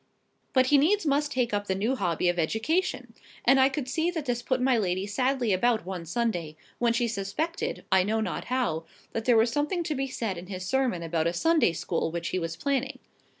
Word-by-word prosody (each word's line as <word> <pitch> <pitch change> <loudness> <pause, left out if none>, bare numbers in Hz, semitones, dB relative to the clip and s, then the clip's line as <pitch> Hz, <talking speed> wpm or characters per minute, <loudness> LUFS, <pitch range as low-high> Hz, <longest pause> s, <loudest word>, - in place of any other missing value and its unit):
But 260 -1 +5
he 285 +2 +5
needs 390 +7 +2
must 290 0 +1
take 245 -4 0
up 205 0 -1
the 190 - 0
new 220 +7 0
hobby 175 -6 0
of 175 0 +1
education; 225 - -1 0.3
and 270 - +6
I 265 +1 +6
could 275 -2 -4
see 320 +6 0
that 325 -5 -4
this 245 -2 -1
put 255 0 0
my 255 0 +3
lady 190 -3 0
sadly 250 +1 0
about 225 +1 +2
one 180 -3 -5
Sunday, 175 -7 -2 0.2
when 240 -1 +3
she 235 +1 +1
suspected, 310 - -3
I 190 -1 +6
know 215 +4 0
not 220 - -3
how, 235 -11 -1 0.3
that 225 -1 -3
there 245 -2 +5
was 225 +1 +4
something 300 +7 0
to 320 -2 -2
be 270 -1 -2
said 220 -8 -3
in 180 - -10
his 185 -1 -6
sermon 250 -7 0
about 165 0 0
a 170 - 0
Sunday 320 - +3
school 165 0 -2
which 170 +1 -3
he 185 - -1
was 165 -1 -3
planning. 275 - -1
235 Hz, 220 wpm, -27 LUFS, 185-270 Hz, 0.3 s, and